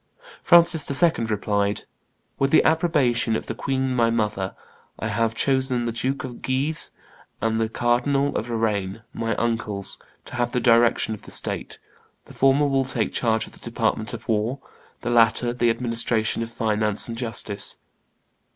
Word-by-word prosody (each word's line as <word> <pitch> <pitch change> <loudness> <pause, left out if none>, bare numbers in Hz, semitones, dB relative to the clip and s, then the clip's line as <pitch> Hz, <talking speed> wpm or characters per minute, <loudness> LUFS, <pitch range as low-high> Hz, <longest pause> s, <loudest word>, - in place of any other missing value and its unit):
Francis 170 -3 +5
II. 140 -4 +2
replied, 105 -1 -1 0.6
"With 135 - +2
the 160 - +5
approbation 145 -9 +2
of - - -3
the - - -4
queen 130 +1 -1
my 115 -1 +3
mother, 105 -4 -1 0.4
I 110 - -3
have 115 +1 0
chosen 130 -2 +1
the 115 - -1
Duke 130 +4 -2
of 125 -2 -8
Guise 140 +4 0 0.5
and 115 0 0
the 110 - 0
Cardinal 125 +5 +1
of 115 - -2
Lorraine, 110 -2 -1
my 115 -1 -2
uncles, 115 -4 -2 0.3
to - - -10
have 120 -1 -1
the 125 - +1
direction 115 -1 +3
of 105 - -8
the - - -13
state; - - -2 0.5
the - - -14
former 135 +2 +3
will 135 -1 +2
take 125 -4 0
charge 115 -2 +1
of - - -14
the - - -14
department 110 -2 -1
of 115 0 -8
war, 110 +4 0 0.4
the 120 - -2
latter 120 +1 +3
the 120 -1 +2
administration 115 -2 +1
of 115 - -3
finance 105 -2 +1
and 115 - -5
justice." 115 -4 -2
115 Hz, 160 wpm, -23 LUFS, 110-130 Hz, 0.6 s, Francis